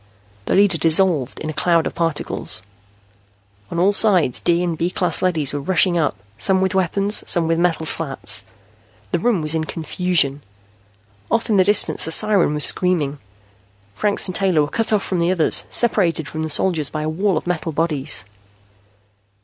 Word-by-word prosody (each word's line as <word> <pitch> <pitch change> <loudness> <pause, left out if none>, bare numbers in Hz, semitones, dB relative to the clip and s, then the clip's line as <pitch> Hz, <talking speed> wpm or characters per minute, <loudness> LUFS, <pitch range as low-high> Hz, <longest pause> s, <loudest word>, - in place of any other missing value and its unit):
The - - 0
leader 195 -4 +3
dissolved 165 -5 +3
in 155 - -4
a - - -10
cloud 165 +2 +1
of - - -4
particles. 165 - -1 1.1
On - - -6
all 190 +4 +2
sides 185 - +2
D 175 +1 +1
and 170 -2 -2
B 170 +2 -2
class 180 -3 0
leadys 160 -7 -1
were 145 - -3
rushing 180 +3 +1
up, 155 -10 0 0.2
some 190 -1 +3
with 190 0 -1
weapons, 195 +3 +1
some 170 -3 +2
with 165 0 0
metal 165 -2 0
slats. 150 -3 +1 0.7
The - - 0
room 200 -4 0
was 155 +1 +2
in 160 -1 -2
confusion. 160 -3 -1 0.9
Off 230 0 -1
in 205 - +2
the 190 - +5
distance 205 -3 +2
a - - -3
siren 200 -5 +2
was 150 - +2
screaming. 155 -6 0 0.7
Franks 205 - 0
and 185 - -5
Taylor 180 -5 +1
were 145 - -4
cut 225 +5 0
off 210 -2 +1
from 185 - -3
the 170 +1 0
others, 180 -4 +1
separated 175 - 0
from 160 - -6
the 160 - -4
soldiers 155 -2 0
by 155 -1 -5
a - - -3
wall 180 +3 -1
of - - -5
metal 175 -2 -3
bodies. 150 - -1
170 Hz, 180 wpm, -19 LUFS, 155-190 Hz, 1.1 s, the